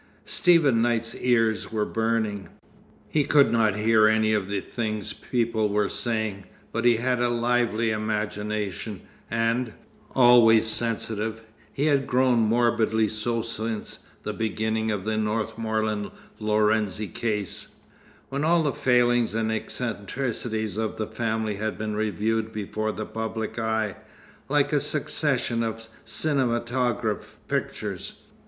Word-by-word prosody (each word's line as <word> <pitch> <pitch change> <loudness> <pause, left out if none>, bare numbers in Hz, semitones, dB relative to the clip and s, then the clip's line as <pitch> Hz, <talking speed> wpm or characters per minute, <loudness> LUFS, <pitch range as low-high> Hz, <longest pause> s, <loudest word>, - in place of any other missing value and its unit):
Stephen 160 -10 +4
Knight's 115 -1 0
ears 115 -4 +1
were 110 -1 0
burning. 110 -3 -1 0.6
He 150 - +1
could 140 0 +4
not 110 -3 +3
hear 110 0 +4
any 110 0 +3
of 100 -3 0
the 100 0 -1
things 110 -1 -4
people 115 -3 0
were 105 0 +1
saying; 110 -5 -2 0.3
but 115 +1 -2
he 120 -1 +6
had 125 +1 0
a 120 0 +2
lively 120 -1 +1
imagination, 105 -1 -3 0.3
and, 115 0 0 0.4
always 120 -3 +7
sensitive, 110 0 0 0.3
he 140 - -1
had 140 -3 +2
grown 125 -1 +3
morbidly 110 -1 +2
so 115 +2 -2
since 110 -1 -4 0.2
the - - -3
beginning 110 +1 -1
of 105 -3 -2
the 110 0 0
Northmorland 110 -1 -1 0.3
Lorenzi 105 -1 +1
case, 105 +1 -3 0.5
when 140 +2 -2
all 165 +1 +3
the 145 -3 0
failings 120 -3 +2
and 110 0 0
eccentricities 110 -1 -3
of 110 -1 -2
the 110 - -1
family 110 -1 -2
had 110 +1 -3
been 105 -1 -3
reviewed 110 +1 -1
before 110 0 -3
the 110 - -5
public 110 +1 -4
eye, 110 -2 -1 0.5
like - - +2
a - - +4
succession 115 -1 0
of 115 0 -3 0.2
cinematograph 120 -5 0
pictures. - - -3
110 Hz, 125 wpm, -25 LUFS, 110-120 Hz, 0.6 s, always